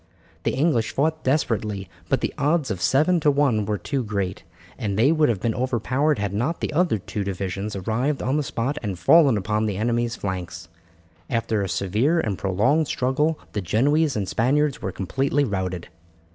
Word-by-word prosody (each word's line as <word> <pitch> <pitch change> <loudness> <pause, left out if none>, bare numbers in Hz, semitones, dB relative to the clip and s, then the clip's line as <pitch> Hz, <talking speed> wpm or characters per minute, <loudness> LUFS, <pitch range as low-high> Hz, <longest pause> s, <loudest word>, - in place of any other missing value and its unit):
The - - +1
English 135 -5 +1
fought 155 +3 0
desperately, 110 -8 0 0.2
but - - +1
the - - -2
odds 150 -3 +1
of 95 -3 -4
seven 155 - +3
to 150 - +3
one 140 -7 +2
were 105 -1 0
too 135 +8 -2
great, 100 -3 -3 0.3
and 105 -6 -3
they 125 +7 +4
would 155 -3 +3
have 110 -5 0
been 115 +3 0
overpowered 130 +4 0
had 100 -1 -2
not 125 +11 -1
the - - -3
other 170 -7 +2
two 100 +1 -4
divisions 100 +2 -4
arrived 115 +9 -1
on 130 - 0
the 150 - +2
spot 135 +2 -2
and 100 -5 -3
fallen 135 - +5
upon 105 +2 0
the 100 -3 -2
enemy's 120 +1 0
flanks. 90 -4 -5 0.6
After 115 -3 0
a 95 - -2
severe 105 - +1
and 105 -10 -1
prolonged 105 - +1
struggle 150 +5 0 0.2
the 105 - -1
Genoese 140 - +2
and 100 -3 -2
Spaniards 140 +6 +1
were 95 - -3
completely 135 +10 0
routed. 95 -6 -3
115 Hz, 180 wpm, -23 LUFS, 100-145 Hz, 0.6 s, fallen